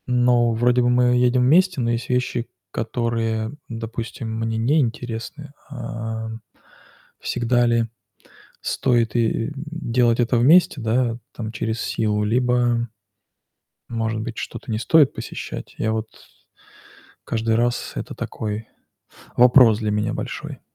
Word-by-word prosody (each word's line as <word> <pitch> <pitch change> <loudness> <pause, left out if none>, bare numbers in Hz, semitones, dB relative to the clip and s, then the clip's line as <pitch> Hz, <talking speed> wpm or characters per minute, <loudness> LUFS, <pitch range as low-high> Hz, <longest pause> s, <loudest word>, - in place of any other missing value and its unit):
Ну, 120 -1 +3
вроде 120 +2 +3
бы 120 - +2
мы 125 0 +3
едем 125 0 +3
вместе, 175 +5 +4
но 115 -1 +1
есть 115 0 -3
вещи, 125 -1 0 0.2
которые, 115 -1 -1 0.2
допустим, 115 0 -5
мне 115 0 -1
неинтересны. 125 +2 -1 0.2
А, 115 -4 -5 0.9
всегда 120 0 +1
ли 115 -1 +2 0.8
стоит 120 -4 +1
и 115 -2 +2 0.2
и - - -12
делать 130 -6 0
это 120 +1 +2
вместе, 145 +3 +5
да, 115 +1 +1 0.2
там, 110 -2 -5
через 110 +1 -3
силу? 105 -1 0
Либо, 120 +1 +1 1.0
может 115 -1 -2
быть, 115 0 -6
что-то 125 - -6
не 110 - -1
стоит 145 +3 +4
посещать? - - -7
Я 110 - 0
вот 110 0 -2 1.2
каждый 110 0 0
раз 120 +1 0
это - - -5
такой 110 0 -4 0.7
вопрос 125 -3 +7
для 110 -2 -1
меня 105 +1 0
большой. - - -5
115 Hz, 125 wpm, -22 LUFS, 110-125 Hz, 1.2 s, вопрос